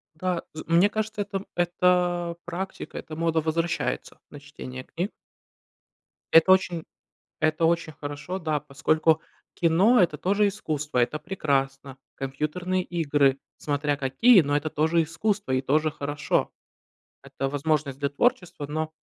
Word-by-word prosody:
Да, 180 Hz, +1 st, -2 dB
з 155 Hz, -, -7 dB
мне 170 Hz, +4 st, +5 dB
кажется, 215 Hz, 0 st, -3 dB
это 200 Hz, -1 st, -4 dB
это 175 Hz, -1 st, +1 dB
практика, 180 Hz, +3 st, -6 dB
эта 155 Hz, -, -7 dB
мода 165 Hz, 0 st, +1 dB
возвращается 165 Hz, +2 st, -2 dB
на 145 Hz, -, -10 dB
чтение 130 Hz, -3 st, -9 dB
книг. 175 Hz, +8 st, -4 dB, 1.2 s
Это 165 Hz, +3 st, +7 dB
очень 180 Hz, -3 st, +3 dB, 0.6 s
это 155 Hz, +1 st, +1 dB
очень 165 Hz, -1 st, 0 dB
хорошо, 145 Hz, +6 st, -6 dB
да, 155 Hz, -4 st, -1 dB
поскольку 155 Hz, +3 st, +1 dB, 0.3 s
кино- 185 Hz, +9 st, +4 dB
это 170 Hz, -4 st, +2 dB
тоже 200 Hz, +6 st, +2 dB
искусство, 150 Hz, -9 st, -3 dB
это 125 Hz, +5 st, +1 dB
прекрасно. 135 Hz, -5 st, -2 dB, 0.2 s
Компьютерные 155 Hz, +7 st, -2 dB
игры- 145 Hz, -6 st, +1 dB, 0.2 s
смотря 145 Hz, 0 st, -1 dB
какие, 180 Hz, -, +5 dB
но 145 Hz, -2 st, +1 dB
это 155 Hz, +1 st, -2 dB
тоже 160 Hz, +3 st, +2 dB
искусство 195 Hz, +1 st, -2 dB
и 130 Hz, -, +2 dB
тоже 155 Hz, +4 st, +1 dB
хорошо. 145 Hz, 0 st, -1 dB, 0.7 s
Это 135 Hz, 0 st, -4 dB
возможность 145 Hz, -1 st, -1 dB
для 140 Hz, -, +1 dB
творчества, 165 Hz, -, 0 dB
но, 155 Hz, +1 st, -3 dB
160 Hz, 130 wpm, -26 LUFS, 145-180 Hz, 1.2 s, Это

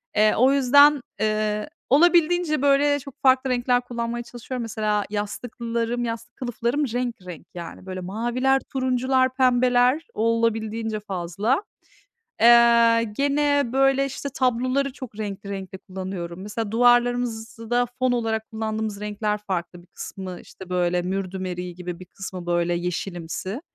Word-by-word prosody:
Eee, 215 Hz, 0 st, +4 dB
o 260 Hz, +3 st, +5 dB
yüzden, 285 Hz, +1 st, +6 dB, 0.2 s
eee, 215 Hz, +2 st, 0 dB, 0.2 s
olabildiğince, 340 Hz, +1 st, +4 dB
böyle, 285 Hz, +1 st, +3 dB
çok 275 Hz, +1 st, -12 dB
farklı 260 Hz, 0 st, +4 dB
renkler 245 Hz, 0 st, +2 dB
kullanmaya 240 Hz, -1 st, -4 dB
çalışıyorum. 240 Hz, +1 st, -6 dB
Mesela 215 Hz, -2 st, -1 dB
yastıklarım, 235 Hz, +3 st, -3 dB
yastık 230 Hz, -1 st, -5 dB
kılıflarım 245 Hz, +3 st, -1 dB
renk 245 Hz, -1 st, -1 dB
renk, 175 Hz, -4 st, -9 dB
yani, 175 Hz, +1 st, -8 dB
böyle 185 Hz, -1 st, -5 dB
maviler, 240 Hz, +7 st, 0 dB
turuncular, 260 Hz, 0 st, +1 dB
pembeler 250 Hz, +2 st, +3 dB
olabildiğince 225 Hz, -1 st, 0 dB
fazla. 200 Hz, -, -1 dB, 0.8 s
Eee, 235 Hz, 0 st, +6 dB
gene, 285 Hz, 0 st, +2 dB
böyle, 270 Hz, 0 st, +3 dB
işte, 275 Hz, +1 st, -5 dB
tabloları 255 Hz, +2 st, +1 dB
çok 255 Hz, -7 st, -10 dB
renkli 200 Hz, -1 st, -5 dB
renkte 190 Hz, -1 st, -6 dB
kullanıyorum. 185 Hz, -2 st, -6 dB
Mesela 210 Hz, +1 st, -4 dB
duvarlarımızı 240 Hz, -1 st, +2 dB
da 245 Hz, 0 st, +2 dB
fon 255 Hz, -1 st, +2 dB
olarak 225 Hz, -2 st, -1 dB
kullandığımız 220 Hz, -1 st, -3 dB
renkler 210 Hz, 0 st, -2 dB
farklı. 180 Hz, -3 st, -4 dB
Bir 175 Hz, -, -22 dB
kısmı, 185 Hz, -2 st, -8 dB
işte, 190 Hz, -2 st, -13 dB
böyle, 180 Hz, -1 st, +1 dB
mürdüm 190 Hz, 0 st, -3 dB
eriği 180 Hz, -1 st, -5 dB
gibi 180 Hz, 0 st, -6 dB
bir 185 Hz, -, -10 dB
kısmı, 185 Hz, -1 st, -8 dB
böyle, 175 Hz, 0 st, +1 dB
yeşilimsi. 180 Hz, -, -4 dB
230 Hz, 130 wpm, -24 LUFS, 195-255 Hz, 0.8 s, yüzden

